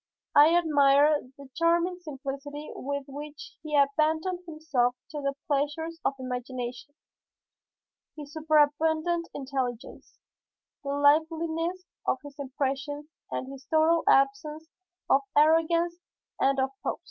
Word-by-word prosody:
I 310 Hz, +4 st, +7 dB
admired 290 Hz, -3 st, +4 dB
the 280 Hz, -1 st, -12 dB
charming 340 Hz, +2 st, +1 dB
simplicity 290 Hz, -1 st, -7 dB
with 280 Hz, +1 st, -4 dB
which 290 Hz, +1 st, -9 dB
he 305 Hz, -1 st, -3 dB
abandoned 315 Hz, +5 st, +2 dB
himself 290 Hz, -6 st, 0 dB, 0.2 s
to 300 Hz, -2 st, -5 dB
the 275 Hz, 0 st, -1 dB
pleasures 300 Hz, +3 st, -1 dB
of 275 Hz, -, 0 dB
imagination, 255 Hz, +1 st, -5 dB, 1.2 s
his 295 Hz, -1 st, -9 dB
superabundant 315 Hz, +2 st, +2 dB
intelligence, 260 Hz, -3 st, -5 dB, 0.7 s
the 280 Hz, -, -5 dB
liveliness 320 Hz, +4 st, +1 dB, 0.2 s
of -, -, +2 dB
his 285 Hz, -1 st, -10 dB
impressions 280 Hz, +2 st, -3 dB, 0.2 s
and 260 Hz, -, -4 dB
his 275 Hz, -1 st, -11 dB
total 320 Hz, +1 st, +3 dB
absence 290 Hz, +3 st, +2 dB, 0.4 s
of 275 Hz, -, +4 dB, 0.2 s
arrogance 330 Hz, +3 st, +3 dB, 0.4 s
and 275 Hz, 0 st, +2 dB
of 265 Hz, 0 st, +1 dB
pose. -, -, -2 dB
295 Hz, 110 wpm, -28 LUFS, 275-320 Hz, 1.2 s, I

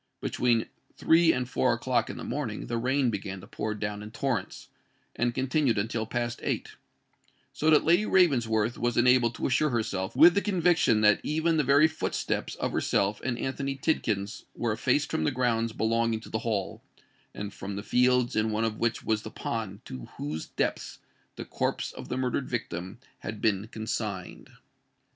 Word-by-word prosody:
Between 120 Hz, -2 st, +1 dB, 0.3 s
three 165 Hz, 0 st, +5 dB
and 125 Hz, -3 st, -1 dB
four 125 Hz, 0 st, +2 dB
o'clock 120 Hz, -1 st, 0 dB
in -, -, -6 dB
the -, -, -6 dB
morning 120 Hz, -5 st, -3 dB
the 120 Hz, -1 st, -2 dB
rain 130 Hz, +1 st, +1 dB
began 100 Hz, -2 st, -5 dB
to -, -, -11 dB
pour 110 Hz, 0 st, -4 dB
down 105 Hz, 0 st, -4 dB
in 105 Hz, -, -8 dB
torrents, 115 Hz, -4 st, -3 dB, 0.5 s
and 120 Hz, 0 st, 0 dB
continued 130 Hz, -2 st, +1 dB
until 110 Hz, +2 st, -1 dB
past 120 Hz, 0 st, -2 dB
eight,—so 155 Hz, -, -5 dB
that 155 Hz, -, +6 dB
Lady 175 Hz, +6 st, +4 dB
Ravensworth 120 Hz, -, +2 dB
was 120 Hz, -1 st, 0 dB
enabled 120 Hz, -1 st, +4 dB
to -, -, -3 dB
assure 145 Hz, +4 st, +2 dB
herself 110 Hz, -4 st, -2 dB
with 165 Hz, +6 st, +8 dB
the 200 Hz, -, +2 dB
conviction 175 Hz, -, +3 dB
that 105 Hz, -1 st, +5 dB
even 160 Hz, +2 st, +1 dB
the 150 Hz, -, +3 dB
very 145 Hz, +3 st, +5 dB
footsteps 160 Hz, 0 st, -3 dB
of -, -, -2 dB
herself 100 Hz, +1 st, 0 dB
and 125 Hz, -2 st, -1 dB
Anthony 135 Hz, +2 st, -3 dB
Tidkins 110 Hz, -8 st, -1 dB
were 120 Hz, -1 st, -1 dB
effaced 145 Hz, +6 st, +1 dB
from 160 Hz, -, 0 dB
the -, -, +2 dB
grounds 120 Hz, -4 st, 0 dB
belonging 115 Hz, 0 st, 0 dB
to -, -, -12 dB
the 110 Hz, -, -2 dB
Hall, 105 Hz, -4 st, -2 dB, 0.5 s
and 105 Hz, 0 st, -5 dB
from 100 Hz, +1 st, -6 dB
the 100 Hz, -, -5 dB
fields 125 Hz, +2 st, +2 dB
in 110 Hz, +1 st, +2 dB
one 110 Hz, +1 st, 0 dB
of 110 Hz, -1 st, -3 dB
which 115 Hz, -1 st, 0 dB
was 110 Hz, -1 st, 0 dB
the 110 Hz, -, -7 dB
pond 110 Hz, -3 st, -5 dB
to 65 Hz, -2 st, -7 dB
whose 75 Hz, +2 st, -4 dB
depths -, -, -2 dB, 0.4 s
the -, -, -7 dB
corpse -, -, -2 dB
of -, -, -10 dB
the -, -, -2 dB
murdered 130 Hz, +1 st, -1 dB
victim 95 Hz, -5 st, -4 dB, 0.2 s
had 105 Hz, 0 st, -6 dB
been 105 Hz, -1 st, +1 dB
consigned. 110 Hz, -4 st, -5 dB
115 Hz, 175 wpm, -28 LUFS, 110-130 Hz, 0.5 s, with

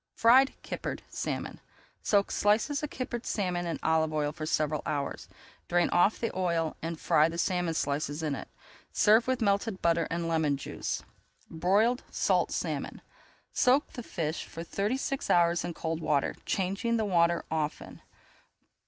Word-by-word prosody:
FRIED 260 Hz, +4 st, +5 dB
KIPPERED -, -, -5 dB
SALMON -, -, -4 dB, 0.4 s
Soak 200 Hz, -1 st, +2 dB
slices 220 Hz, +8 st, +2 dB
of 300 Hz, -, -3 dB
kippered 250 Hz, -2 st, -4 dB
salmon 180 Hz, -4 st, -1 dB
in 165 Hz, -, -2 dB
olive 160 Hz, -1 st, +2 dB
oil 150 Hz, -1 st, 0 dB
for 155 Hz, +1 st, -6 dB
several 155 Hz, -1 st, 0 dB
hours. 140 Hz, -2 st, -3 dB, 0.4 s
Drain 175 Hz, 0 st, +2 dB
off 175 Hz, +5 st, +3 dB
the 230 Hz, -, -2 dB
oil 170 Hz, -4 st, 0 dB
and 165 Hz, 0 st, -4 dB
fry 155 Hz, +2 st, +4 dB
the 165 Hz, -, -6 dB
salmon 175 Hz, -2 st, 0 dB
slices 145 Hz, +1 st, -1 dB
in 150 Hz, -2 st, 0 dB
it. -, -, -6 dB, 0.4 s
Serve 220 Hz, +3 st, +4 dB
with 260 Hz, -3 st, 0 dB
melted 200 Hz, 0 st, +1 dB
butter 170 Hz, -1 st, +2 dB
[Page 165 Hz, -, -2 dB
306] -, -, -2 dB
and -, -, -2 dB
lemon 160 Hz, -4 st, +1 dB
juice. -, -, -4 dB, 0.5 s
BROILED 200 Hz, +9 st, +2 dB
SALT -, -, +1 dB
SALMON -, -, -3 dB, 0.5 s
Soak 260 Hz, +4 st, +3 dB
the 245 Hz, -, -6 dB
fish 160 Hz, -7 st, -3 dB
for 165 Hz, -, -7 dB
thirty 200 Hz, +8 st, -1 dB
six 275 Hz, 0 st, -3 dB
hours 170 Hz, 0 st, +3 dB
in 170 Hz, -, -4 dB
cold 160 Hz, 0 st, -3 dB
water, 150 Hz, -3 st, +1 dB
changing 200 Hz, +5 st, 0 dB
the 220 Hz, -, 0 dB
water 170 Hz, -3 st, +2 dB
often. 155 Hz, -1 st, -3 dB
175 Hz, 160 wpm, -29 LUFS, 160-215 Hz, 0.5 s, FRIED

